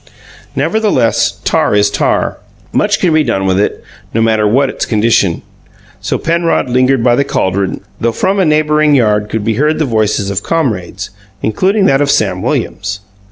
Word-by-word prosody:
Nevertheless, 210 Hz, -, +1 dB
tar -, -, +1 dB
is 105 Hz, 0 st, +2 dB
tar. -, -, 0 dB, 0.4 s
Much -, -, +1 dB
can 175 Hz, -3 st, +1 dB
be 155 Hz, 0 st, +3 dB
done 95 Hz, -7 st, -1 dB
with 95 Hz, 0 st, +1 dB
it, 105 Hz, -, -1 dB, 0.3 s
no -, -, +2 dB
matter 110 Hz, -1 st, +2 dB
what 135 Hz, +6 st, +2 dB
its -, -, -4 dB
condition; 105 Hz, -5 st, +1 dB, 0.6 s
so -, -, -2 dB
Penrod 165 Hz, -4 st, 0 dB
lingered 130 Hz, 0 st, +2 dB
by 120 Hz, -1 st, +4 dB
the 140 Hz, -, +2 dB
caldron, 95 Hz, -7 st, -1 dB, 0.2 s
though 115 Hz, -, 0 dB
from 195 Hz, -, 0 dB
a 190 Hz, -, +3 dB
neighbouring 150 Hz, -1 st, +2 dB
yard 105 Hz, -4 st, +1 dB
could 110 Hz, -2 st, -2 dB
be 115 Hz, -, +1 dB
heard 155 Hz, +1 st, +1 dB
the 155 Hz, -, 0 dB
voices 105 Hz, -4 st, 0 dB
of 100 Hz, 0 st, -2 dB
comrades, 105 Hz, -, -2 dB, 0.3 s
including 195 Hz, -, +1 dB
that 135 Hz, -6 st, +3 dB
of 145 Hz, -, +1 dB
Sam -, -, +1 dB
Williams. 100 Hz, 0 st, -3 dB
120 Hz, 170 wpm, -13 LUFS, 105-150 Hz, 0.6 s, by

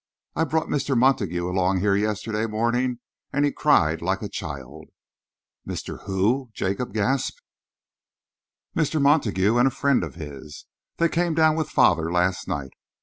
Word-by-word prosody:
I 160 Hz, -, +2 dB
brought 160 Hz, 0 st, 0 dB
Mr. 140 Hz, -2 st, -1 dB
Montague 100 Hz, -9 st, +2 dB
along 95 Hz, +1 st, +1 dB
here 100 Hz, 0 st, +2 dB
yesterday 105 Hz, +1 st, -1 dB
morning, 120 Hz, +3 st, 0 dB, 0.3 s
and 145 Hz, +1 st, +2 dB
he 145 Hz, -, +1 dB
cried 80 Hz, -, +2 dB
like 95 Hz, +4 st, -1 dB
a 105 Hz, -, -4 dB
child." 70 Hz, -10 st, -7 dB, 0.8 s
"Mr. -, -, -6 dB
Who?" 110 Hz, +7 st, +1 dB
Jacob 100 Hz, +6 st, -2 dB
gasped. 110 Hz, +5 st, -1 dB, 1.3 s
"Mr. 155 Hz, 0 st, +1 dB
Montague 120 Hz, -8 st, +3 dB
and 125 Hz, +2 st, +5 dB
a -, -, +4 dB
friend 140 Hz, +1 st, +1 dB
of -, -, -6 dB
his. 75 Hz, -2 st, -9 dB, 0.3 s
They 170 Hz, -, +3 dB
came 170 Hz, 0 st, 0 dB
down 160 Hz, -1 st, +4 dB
with 160 Hz, -2 st, -2 dB
father 80 Hz, -1 st, +3 dB
last 90 Hz, +1 st, 0 dB
night. 70 Hz, -2 st, -4 dB
110 Hz, 145 wpm, -24 LUFS, 90-140 Hz, 1.3 s, and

